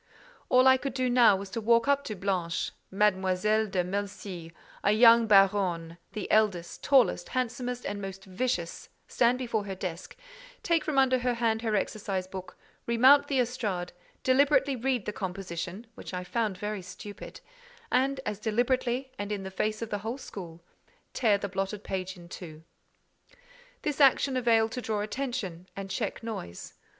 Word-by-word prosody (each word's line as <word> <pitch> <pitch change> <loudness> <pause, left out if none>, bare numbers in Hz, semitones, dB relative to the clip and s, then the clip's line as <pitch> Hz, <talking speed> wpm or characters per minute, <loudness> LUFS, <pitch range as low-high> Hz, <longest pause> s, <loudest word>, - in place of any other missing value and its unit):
All 255 0 +5
I 260 0 +7
could 270 0 -4
now 245 -4 +5
do - - -4
was 195 -1 -8
to 230 - -3
walk 230 +3 +3
up 280 0 +3
to 215 - -4
Blanche—Mademoiselle 190 +2 0
de 185 -2 0
Melcy, 190 -3 -5 0.3
a 205 - +4
young 230 +1 +7
baronne—the 190 -2 +1
eldest, 205 -6 +1
tallest, 270 -4 +3
handsomest, 250 0 -3
and 205 0 -3
most 195 0 -7
vicious—stand 235 +3 -1
before 230 -5 -2
her 195 -1 -5
desk, 180 -2 -6 0.5
take 330 -2 +2
from 300 -3 -2
under 260 -1 +4
her 245 0 0
hand 225 -1 0
her 220 -2 0
exercise 195 -2 -2
book, 185 0 -9 0.3
remount 260 +5 +6
the 275 - 0
estrade, 220 -8 -2 0.3
deliberately 275 +1 +3
read 250 -2 -1
the 210 - -3
composition, 185 +1 -5
which 190 - -8
I 180 - -3
found 210 0 -1
very 210 +1 -4
stupid, 185 +3 -10 0.5
and, 270 +2 +2
as 210 - -3
deliberately, 245 +3 0
and 205 0 -4
in 200 -2 -3
the 190 - -6
face 215 +4 -1
of 225 - -7
the 205 - -1
whole 225 +5 -4
school, 170 -9 -9 0.5
tear 220 -5 +3
the 200 - -4
blotted 195 +2 -3
page 190 0 -4
in 175 -1 -13
two. 160 -3 -10 1.2
This 300 -1 -1
action 275 0 +5
availed 225 -3 +3
to 250 - -4
draw 215 -3 -2
attention 210 -6 -4
and 195 -1 -6
check 220 0 -3
noise. 200 - -6
210 Hz, 160 wpm, -28 LUFS, 190-245 Hz, 1.2 s, I